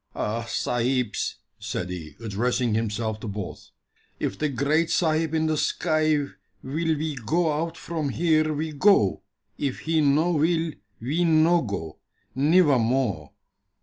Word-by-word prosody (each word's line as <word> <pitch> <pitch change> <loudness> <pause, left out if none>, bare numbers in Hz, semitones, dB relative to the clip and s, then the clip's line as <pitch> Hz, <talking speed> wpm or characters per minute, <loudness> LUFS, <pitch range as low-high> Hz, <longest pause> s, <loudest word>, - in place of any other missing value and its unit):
"Ah, 115 +2 -2
sahibs," 120 -1 -1 0.2
said 90 0 -4
he, 80 -5 -7
addressing 115 +2 0
himself 110 0 -1
to 110 - -7
both, 100 -2 -6 0.5
"if - - -2
the 150 - -1
Great 145 +5 +1
Sahib 160 -1 +1
in 160 0 +1
the 155 -1 +1
sky 155 -1 +1 0.5
will 160 +3 -1
we 155 +1 -2
go 165 +6 +1
out 165 +3 -2
from 160 -4 -3
here, 155 +1 +2
we 155 +1 -2
go 150 - +3 0.4
if 140 -3 -2
He 160 0 +1
no 150 +4 +3
will, 165 +1 +1 0.3
we 145 +9 0
no 165 +1 +4
go 90 - -5 0.4
nivvamore." 130 - +2
150 Hz, 135 wpm, -25 LUFS, 115-160 Hz, 0.5 s, no